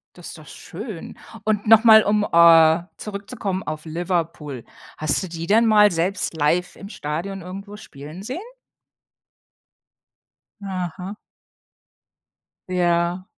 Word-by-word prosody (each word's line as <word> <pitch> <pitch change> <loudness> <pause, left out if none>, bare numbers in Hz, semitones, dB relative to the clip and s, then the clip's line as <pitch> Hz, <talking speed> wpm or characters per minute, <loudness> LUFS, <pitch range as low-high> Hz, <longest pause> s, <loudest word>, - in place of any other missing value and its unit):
Das 175 - -11
ist - - -10
doch 155 - -15
schön. 195 - -9 0.3
Und 215 -1 -1
noch 225 +1 +6
mal, 220 -1 +8
um, 210 0 +1
äh, 165 -2 +6
zurückzukommen 200 -2 -5
auf 155 0 -6
Liverpool. 165 -5 -4 0.3
Hast 155 +3 0
du 190 - -5
die 165 0 -6
denn 225 +4 +4
mal 210 -1 +5
selbst 175 +2 -2
live 165 +4 0
im 200 - -10
Stadion 180 +2 -5
irgendwo 195 +3 -9
spielen 155 -3 -11
sehen? 255 - -5 2.2
Aha. 185 0 -5 1.5
Ja. 175 0 0
180 Hz, 115 wpm, -22 LUFS, 165-205 Hz, 2.2 s, mal